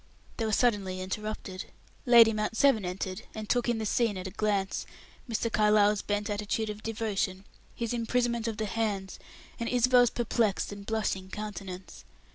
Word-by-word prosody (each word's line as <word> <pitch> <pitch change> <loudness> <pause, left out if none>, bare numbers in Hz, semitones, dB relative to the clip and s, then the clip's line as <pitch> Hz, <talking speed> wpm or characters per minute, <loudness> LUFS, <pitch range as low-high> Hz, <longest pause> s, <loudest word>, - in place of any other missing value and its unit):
They 225 - -1
were - - -1
suddenly 205 -6 +1
interrupted. 190 0 -5 0.4
Lady 230 -2 +8
Mount 215 +1 -2
Severn 250 -8 +4
entered, 185 +2 -4
and 215 -1 -5
took 245 +1 +1
in 235 - +1
the 220 - -3
scene 220 -1 +1
at 185 - -6
a 190 - -5
glance; 200 -2 -1 0.4
Mr. 230 0 -1
Carlyle's 210 -1 +4
bent 205 0 -1
attitude 210 +1 -1
of 210 0 -9
devotion, 205 -4 -2 0.3
his 235 0 -2
imprisonment 235 0 0
of 220 -2 -3
the 220 - -1
hands, 205 -3 -2 0.4
and 235 - -2
Isabel's 245 0 +5
perplexed 225 -4 0
and 200 0 -9
blushing 200 -4 -1
countenance. 195 -3 -7
215 Hz, 160 wpm, -29 LUFS, 200-230 Hz, 0.4 s, Lady